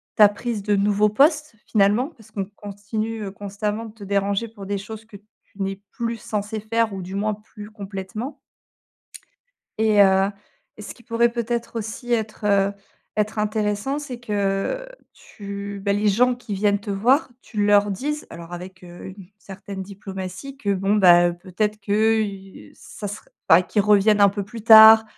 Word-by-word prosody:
ta 210 -1 +8
prise 215 0 -4
de 205 0 +1
nouveau 205 +1 +3
poste, 295 +2 +2
finalement, 215 +6 +2
parce 225 -9 -20
qu'on 200 -2 -3
continue, 215 +2 -5
heu, 195 - -5
constamment 205 +2 -4
de 215 - -11
te 215 -3 -13
déranger 200 +3 -1
pour 205 -3 -11
des 200 0 -2
choses 220 +2 -9
que 220 -2 -15
tu 205 -1 -16
n'es 195 0 -3
plus 230 0 -3
censé 215 0 -4
faire 225 0 0
ou 190 - -5
du 185 +2 -7
moins 210 +1 -1
plus 210 0 -13
complètement 205 +5 -7 1.4
et 215 -2 +3
heu 190 0 +4 0.5
et 215 - -10
ce - - -8
qui 240 - -19
pourrait 235 +1 +1
peut-être 235 0 -3
aussi 225 +3 -5
être, 220 -2 -2
heu, 200 -1 +3 0.4
être 215 +1 -1
intéressant, 210 +5 -1
c'est 260 -5 -7
que 205 - -2 0.3
tu 200 0 -8
bah 200 - +2
les 205 +1 +1
gens 245 +5 +3
qui 235 -4 -6
viennent 205 +1 +1
te 205 0 -7
voir, 245 +10 +2
tu 210 -2 -2
leur 205 0 +4
disent, 295 +10 -3
alors 170 +1 -10
avec, 185 +1 -9
heu, 175 0 -11
une 190 -1 -11
certaine 195 0 -8
diplomatie, 190 +5 -8
que 205 -7 -1
bon, 195 +2 0
bah, 175 -3 +6
heu, 175 - -2
peut-être 205 +4 -3
que, 220 +2 +2 0.5
heu, - - -20
ça 205 - -8
serait 205 - -9 0.2
bah 165 +3 +7
qu'ils 205 +3 0
reviennent 210 0 +4
un 200 - +7
peu 200 0 -3
plus 220 +2 -9
tard 220 0 +9
205 Hz, 180 wpm, -22 LUFS, 200-225 Hz, 1.4 s, tard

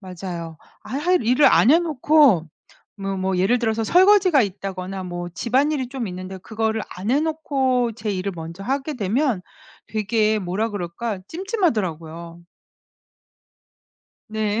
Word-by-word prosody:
맞아요. 175 -3 -7 0.3
아 265 - -5
할 360 +4 +2
일을 250 +6 +4
안 235 - +5
해놓고 295 - +4 0.5
뭐 195 -1 -3
뭐 190 0 -1
예를 195 +7 +3
들어서 225 -1 0
설거지가 370 - +5
있다거나 190 -1 -5
뭐 175 -1 -5
집안일이 260 - 0
좀 255 -3 -4
있는데 185 +1 -7
그거를 220 +2 -2
안 190 +5 -4
해 275 +3 +3
놓고 270 -6 0
제 215 -1 -4
일을 195 0 -2
먼저 165 +3 -8
하게 275 +4 -2
되면 235 +1 0 0.5
되게 215 0 +1
뭐라 195 +4 -2
그럴까? 200 +2 -4
찜찜하더라고요. 180 - -2 1.9
네 215 0 -1
220 Hz, 270 characters per minute, -22 LUFS, 185-270 Hz, 1.9 s, 안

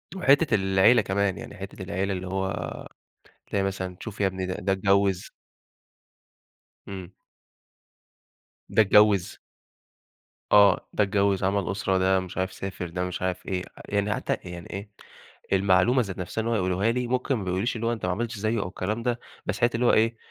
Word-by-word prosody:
وحتّة 145 - +4
العيلة 95 +4 +4
كمان، 100 -1 0
يعني - - -9
حتّة 95 0 -8
العيلة 95 +1 -2
اللي 95 0 -5
هو 95 +1 -1 1.0
تلاقي 100 - +1
مثلًا 95 -2 -3
شوف 110 -2 -8
يا 100 - +3
ابني 95 -1 -2
ده 90 - -3
ده 95 +2 -1
اتجوّز 100 -1 +2 1.6
إمم. 95 -2 -8 1.6
ده - - +4
اتجوّز 100 -2 +4 1.1
آه 100 -2 +5
ده 105 - +3
اتجوّز 100 -1 +1
عمل 95 -1 0
أسرة 95 -1 0
ده 95 0 +3
مش 90 -2 -8
عارف 95 0 -1
سافر 95 -2 -5
ده 90 +2 -3
مش 90 0 -4
عارف 90 0 -2
إيه، 95 -1 -2 0.3
يعني 100 +1 +1
حتّى - - -2
يعني 85 -1 -8
إيه، 100 +2 -6 0.7
المعلومة 100 +6 +3
ذات 100 -6 -5
نفْسها 90 +4 -3
إن 115 - -3
هو 115 - +1
يقولوها 95 +2 +1
لي، 125 +1 -1
ممكن 130 +2 0
ما 110 - -3
بيقولوليش 95 +6 -1
اللي 115 0 -2
هو 120 - +1
أنت 110 -5 -4
ما 90 - 0
عملتش 115 +3 -3
زيّه 110 +2 0
أو - - -3
الكلام 105 +5 -3
ده، 120 -1 0 0.3
بس 105 - -2
حتّة 120 0 +2
اللي 120 +2 +1
هو - - +5
إيه 115 +1 +3
100 Hz, 175 wpm, -26 LUFS, 95-110 Hz, 1.6 s, آه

